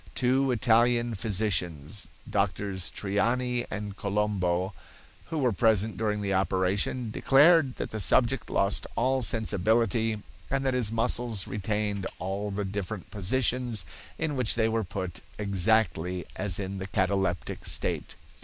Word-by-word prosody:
Two 130 +2 +2
Italian 120 0 +3
physicians, 95 -6 -1 0.2
Drs. 100 -2 -1
Triani 120 +5 0
and 105 -1 -5
Colombo 100 -3 0 0.5
who 165 - -4
were 130 -5 +2
present 110 0 +2
during 105 0 -1
the 100 -1 -1
operation, 95 +5 0
declared 140 +2 +5
that - - -5
the 110 - -4
subject 120 +4 +3
lost 100 +1 +1
all 130 0 +1
sensibility 110 0 +1 0.3
and 135 0 -1
that 130 - +2
his 120 -4 +2
muscles 115 -2 +1
retained 105 -1 -2
all 100 +3 -3
the 100 0 -3
different 100 0 -5
positions 120 +2 +1 0.3
in 155 -3 -1
which 125 -4 0
they 110 -1 +2
were 115 0 0
put 95 -3 -5 0.2
exactly 95 -3 +1
as 100 -4 -1
in 95 -1 -4
the 95 - -5
cataleptic 95 -2 -1
state. - - -1
105 Hz, 130 wpm, -28 LUFS, 95-120 Hz, 0.5 s, declared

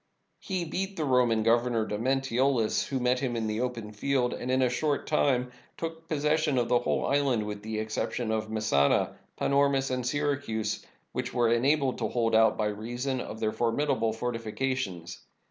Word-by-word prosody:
He 185 -3 -3
beat 190 +4 -3
the 155 - 0
Roman 125 -4 +3
governor, 115 0 +2
Domnentiolus, 130 +1 +1
who 135 -2 -2
met 125 0 +2
him 125 -3 -2
in 115 -1 -1
the 110 +1 -1
open 120 -4 -3
field, 125 +3 0
and 125 - -5
in 130 0 +3
a - - +4
short 145 +3 0
time 125 -4 +1 0.3
took 165 0 -6
possession 155 -2 +1
of 120 -1 +1
the 125 -1 +4
whole - - 0
island, 135 -6 +1
with 105 -1 -5
the 110 +1 -4
exception 110 +1 -2
of 110 0 -1
Messana, 110 -11 +2 0.2
Panormus, 140 -1 +2
and 125 -1 -1
Syracusae, 125 -6 -1 0.3
which - - -4
were 120 -2 +3
enabled 135 +2 +2
to - - 0
hold 115 -2 0
out 110 0 +5
by 110 - 0
reason 120 +5 -2
of 110 - -7
their 110 - 0
for 115 +1 0
midable 115 -4 0
fortifications. 115 -5 -3
125 Hz, 175 wpm, -28 LUFS, 110-140 Hz, 0.3 s, out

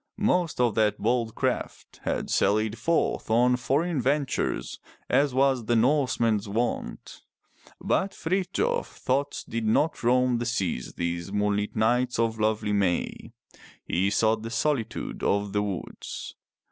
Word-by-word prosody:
Most 180 - +1
of 120 -3 +3
that 105 -1 +2
bold 115 -1 0
craft - - -3
had - - -2
sallied 110 +2 +2
forth 165 0 0
on 120 +3 +4
foreign 145 +5 0
ventures 140 +1 -1 0.3
as 140 +2 +3
was 130 -2 +2
the 120 - +2
Norseman's 115 -4 +2
wont. 115 +4 -3 0.6
But 195 - 0
Frithjof's 195 - -1
thoughts 140 +2 -1
did 115 -1 -3
not 150 +8 +2
roam 125 0 +3
the 120 - -2
seas 95 - -2
these 85 +2 -3
moon 105 0 +1
lit 105 0 -3
nights 120 +3 +2
of 115 -1 0
lovely 110 -1 +1
May. 95 -4 -1 0.5
He 95 +3 +1
sought 110 +1 +2
the 115 - -5
solitude 120 0 -2
of 100 0 0
the 105 - +2
woods. 100 -3 -5
115 Hz, 135 wpm, -26 LUFS, 105-135 Hz, 0.6 s, on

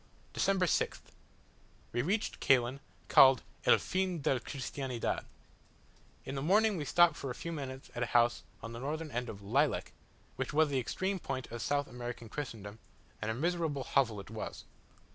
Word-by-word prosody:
December 195 -2 +2
6th. - - -1 0.8
We 120 - +1
reached 200 - -1
Caylen, 130 0 +3 0.3
called 130 -3 +7 0.2
"el - - +8
fin 185 -2 -1
del 130 - +2
Cristiandad." 130 -2 -3 1.0
In - - -5
the 135 - -3
morning 210 +7 +4
we 155 -4 -3
stopped 175 +4 +5
for 135 - -5
a 125 - -4
few 170 - -5
minutes 135 -4 -6
at 120 - -4
a 125 - +1
house 120 0 +3 0.2
on 115 - -5
the 115 - -6
northern 155 +4 -3
end 120 0 -2
of 100 -1 -8
Laylec, 135 +8 +1 0.5
which - - -3
was 155 0 +4
the 135 -2 +1
extreme 190 +10 -2
point 130 -6 -4
of 120 0 -5
South 145 0 +1
American 120 -2 -7
Christendom, 110 -6 -6 0.4
and 110 - -2
a 110 - -1
miserable 160 -1 -1
hovel 115 -5 +1
it 100 +1 -10
was. 110 - -6
135 Hz, 170 wpm, -33 LUFS, 120-160 Hz, 1.0 s, el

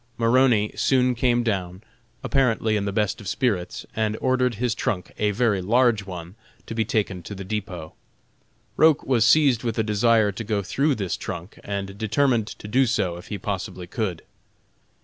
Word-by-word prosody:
Maroney 115 -2 +3
soon 125 -2 +2
came 120 0 +1
down, 95 -3 -2 0.4
apparently 125 -5 +1
in 100 -1 -1
the 100 - -1
best 105 0 -1
of 100 - -9
spirits, 105 -5 -1
and 110 -1 0
ordered 130 -2 +1
his 120 +1 0
trunk, 90 -4 -3
a 105 - +2
very 105 -2 +1
large 115 0 +2
one, 90 -1 -7 0.3
to - - -6
be 115 0 +1
taken 105 -6 -1
to 100 +4 -8
the 95 - -7
depot. 95 -5 -5 0.8
Roch 155 -2 +5
was 125 -4 +2
seized 140 -7 +4
with 115 -2 -2
a 110 - +2
desire 110 0 +3
to 100 +3 -6
go 105 -2 -1
through 140 +10 +1
this 95 -6 -2
trunk, 85 +5 -7
and 100 0 -5
determined 115 +1 +1
to 105 - -9
do 130 +5 +3
so 95 -7 0
if 90 - -12
he 105 - -4
possibly 95 -4 -4
could. 90 -3 -3
110 Hz, 175 wpm, -24 LUFS, 100-120 Hz, 0.8 s, Roch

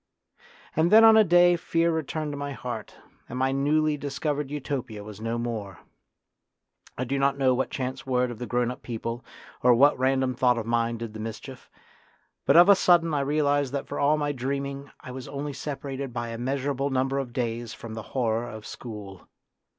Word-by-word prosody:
And 160 +3 +2
then 220 +1 +8
on 225 0 +9
a 220 - +7
day 175 -1 +5
fear 170 0 +1
returned 155 -1 -2
to - - -4
my 145 0 -4
heart, 120 -3 -6 0.3
and 125 - -5
my 130 +1 +1
newly 150 +2 +1
discovered 145 0 -3
Utopia 130 -7 -4
was 105 0 -10
no 115 +1 -2
more. 110 -6 -4 1.2
I 130 - -1
do 135 +2 -1
not 140 0 +2
know 130 -2 +3
what 130 +1 -1
chance 130 +2 -4
word 125 -2 0
of 115 - -9
the 120 - -5
grown 120 0 0
up 125 - -9
people 115 0 -5 0.4
or 125 -1 +6
what 140 +5 +5
random 130 0 +2
thought 125 0 +2
of 115 - -3
mine 115 0 0
did 115 -1 -6
the 110 - -8
mischief; 115 +4 -8 0.8
but - - +6
of 175 +2 +9
a 200 - +9
sudden 175 -3 +4
I 145 - +1
realised 145 -1 +1
that 140 - -2
for - - -5
all 145 +2 +3
my 145 -1 -1
dreaming 140 +1 -4
I 130 - -9
was 130 -1 -7
only 145 +1 -5
separated 135 -1 -5
by 120 0 -4
a 115 - -5
measurable 135 +2 -1
number 135 +1 0
of 130 -3 -4
days 120 -2 -3
from 115 -2 -9
the 110 - -5 0.2
horror 115 -1 0
of 110 -2 -9
school. 105 -5 -9
130 Hz, 195 wpm, -26 LUFS, 120-145 Hz, 1.2 s, on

